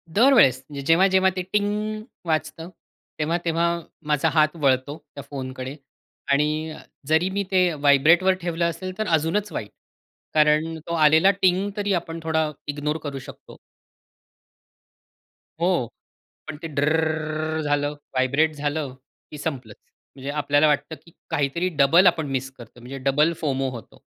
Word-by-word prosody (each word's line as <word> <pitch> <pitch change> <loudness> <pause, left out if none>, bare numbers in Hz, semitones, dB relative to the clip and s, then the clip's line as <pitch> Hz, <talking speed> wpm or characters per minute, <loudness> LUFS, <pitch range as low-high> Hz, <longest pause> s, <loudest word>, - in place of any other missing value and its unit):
दरवेळेस 215 - +5 0.2
जेव्हा-जेव्हा 190 +3 +4
ते 185 - -2
टिंग 210 +1 -1 0.2
वाजतं, 160 +1 -2 0.5
तेव्हा 165 +3 0
तेव्हा 165 +1 +1 0.4
माझा 150 -2 +2
हात 155 0 +3
वळतो 135 +1 +1 0.2
त्या 140 - -7
फोनकडे 130 -1 -6 0.6
आणि 155 +2 +1
अ, - - -9 0.3
जरी 160 +4 +2
मी 200 +1 -1
ते 180 -2 +3
व्हायब्रेटवर 150 +6 +4
ठेवलं 170 0 -1
असेल 185 +2 -6
तर 215 - -2
अजूनच 165 +5 0
वाईट 105 -8 -5 0.6
कारण 155 +1 +3
तो 170 - -3
आलेला 160 +4 +5
टिंग 190 +2 +3
तरी 205 -1 0
आपण 165 -1 -3
थोडा 160 -1 0 0.2
इग्नोर 150 +1 -2
करू 140 -2 -5
शकतो. - - -13 2.0
हो, 170 -9 +1 0.6
पण 150 -1 -6
ते 165 - -4
ड्रररर 155 +1 -1
अ, - - -1
झालं, 145 -1 0 0.2
व्हायब्रेट 140 +5 +1
झालं 145 -2 -3 0.4
की 150 - -8
संपलच. 130 -8 -5 0.4
म्हणजे 135 +1 -7
आपल्याला 145 0 +2
वाटतं 150 +2 0
की 170 - -17 0.2
काहीतरी 160 +3 0
डबल 170 +7 +6
आपण 160 -4 +2
मिस 130 0 -2
करतो 120 0 -14
म्हणजे 125 +3 -8
डबल 150 +5 +3
फोमो 135 -3 -1
होतो. 115 -5 -11
155 Hz, 140 wpm, -23 LUFS, 145-170 Hz, 2.0 s, डबल